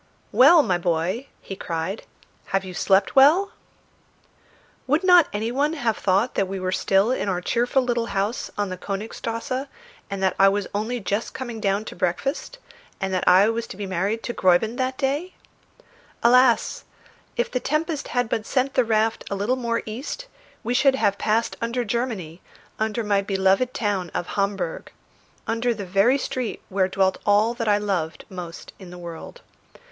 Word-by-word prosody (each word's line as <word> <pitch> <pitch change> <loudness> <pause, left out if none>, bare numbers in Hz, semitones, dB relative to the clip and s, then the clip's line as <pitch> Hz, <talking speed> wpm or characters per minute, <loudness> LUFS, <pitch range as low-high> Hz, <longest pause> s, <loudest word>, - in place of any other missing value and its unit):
"Well, 300 +5 +7
my 180 -6 0
boy," 175 +9 -1
he 195 - -7
cried, 175 +3 -4 0.4
"have 195 0 -1
you 185 - -7
slept 195 +2 +2
well?" 315 +9 +6 1.4
Would 300 +7 +2
not 360 -4 +7
any 220 +3 -2
one 290 +5 +1
have 240 -8 0
thought 200 +6 +1
that 195 - 0
we 195 0 -4
were 185 0 -2
still 195 +3 +2
in 230 -5 -1
our 180 -2 0
cheerful 245 +7 +1
little 240 -2 -1
house 200 +3 -2
on 205 -1 -1
the 185 -1 -6
Königstrasse 230 +6 -4 0.4
and 195 -1 -4
that 190 - +2
I 195 0 +7
was 200 0 -1
only 220 +4 -2
just 205 +2 -3
coming 240 -4 -5
down 200 0 0
to - - -8
breakfast, 265 - -2 0.4
and 190 0 -2
that 185 - -1
I 185 +3 +7
was 230 0 -2
to - - -9
be 205 - -4
married 195 +4 -2
to 240 - -3
Gräuben 185 +6 +2
that 260 0 -1
day? 290 +7 -2 0.9
Alas! 250 - +4 0.5
if 485 - 0
the 250 - 0
tempest 305 +2 -2
had 245 -1 0
but 220 - -1
sent 265 +1 0
the 255 - +3
raft 220 0 +1
a 200 - -2
little 205 +6 0
more 235 -2 -2
east, 260 - -6 0.4
we 240 +2 -1
should 270 +1 +4
have 200 -6 +1
passed 225 +2 0
under 235 +1 -1
Germany, 200 -8 -3 0.4
under 220 +1 -1
my 205 -1 +2
beloved 195 +4 +1
town 205 -9 -2
of 175 - -3
Hamburg, 195 -4 -2 0.5
under 230 +1 0
the 200 -2 -6
very 200 +8 +3
street 255 -3 -4
where 190 -1 +1
dwelt 190 0 +1
all 210 +3 +3
that 235 -2 -4
I 205 -1 +4
loved 185 -6 -2
most 175 -3 -8
in 190 -3 -11
the 180 - -10
world. 170 -2 -9
215 Hz, 175 wpm, -23 LUFS, 195-250 Hz, 1.4 s, Well